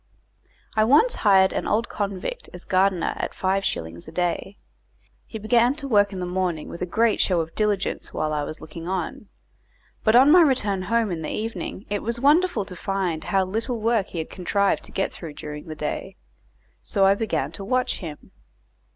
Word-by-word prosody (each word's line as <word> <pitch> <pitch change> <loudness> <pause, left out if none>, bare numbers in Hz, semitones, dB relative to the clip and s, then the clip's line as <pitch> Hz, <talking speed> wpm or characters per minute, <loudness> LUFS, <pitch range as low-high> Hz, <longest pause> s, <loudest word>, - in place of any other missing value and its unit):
I 215 - +4
once 295 - +5
hired 190 -3 +5
an - - -2
old 225 +2 +1
convict 200 - -4
as 180 - -7
gardener 185 -2 +2
at - - -4
five 195 +1 0
shillings 85 - -3
a - - -8
day. 180 +2 -2 0.7
He 220 - -6
began 235 +4 +3
to 285 -2 -6
work 205 -4 +4
in 190 - -5
the 180 - -2
morning 180 -3 -2
with 170 - -8
a 180 - -1
great 225 +4 +2
show 180 -3 +2
of 165 0 -3
diligence 210 -2 -1
while 155 0 -1
I 150 - 0
was 155 +2 -5
looking 165 +2 -9
on. 190 +2 -3 0.8
But 220 +1 +4
on 265 +4 +7
my 355 +2 +8
return 215 - +2
home 225 +2 +1
in 165 -2 -3
the 155 - -4
evening 220 -2 -4
it 205 -1 -2
was 235 +2 -2
wonderful 295 - +3
to 180 - -9
find 180 -3 -2
how 195 -1 +2
little 225 +5 -2
work 220 -2 +1
he - - -8
had 160 - -4
contrived 200 +2 0
to - - -13
get 195 - -1
through 160 -4 -8
during 150 +1 -7
the 160 -2 -7
day; 150 0 -4 0.7
so 195 - +2
I 195 - +6
began 165 - -1
to 165 +4 -6
watch 255 +4 0
him. 155 -5 -9
195 Hz, 195 wpm, -24 LUFS, 175-225 Hz, 0.8 s, my